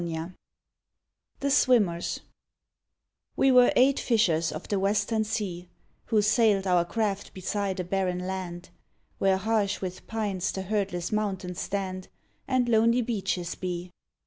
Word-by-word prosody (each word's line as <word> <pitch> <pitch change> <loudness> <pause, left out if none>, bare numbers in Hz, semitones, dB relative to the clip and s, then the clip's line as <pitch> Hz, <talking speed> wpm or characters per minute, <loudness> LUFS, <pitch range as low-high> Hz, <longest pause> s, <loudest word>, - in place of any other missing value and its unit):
50 165 +1 -4 1.1
THE 280 0 0
SWIMMERS 210 -11 +2 1.1
We 270 - +4
were 250 -1 +6
eight 265 +2 +4
fishers 170 -9 +2
of - - -7
the 200 - 0
western 210 +3 +1
sea, 185 -5 -4 0.4
Who 215 -3 +2
sailed 215 -2 +3
our 180 -2 +3
craft 200 +1 -2
beside 195 0 -2
a - - 0
barren 180 0 -1
land, 185 -2 -5 0.5
Where 195 -1 +3
harsh 205 0 0
with 185 -1 -6
pines 205 -4 -2
the 190 - -4
herdless 190 -3 -2
mountains 190 -4 -2
stand 185 -2 -3 0.4
And 255 -2 +1
lonely 230 +1 +3
beaches 190 -6 -2
be. 180 -1 -5
195 Hz, 130 wpm, -27 LUFS, 180-220 Hz, 1.1 s, were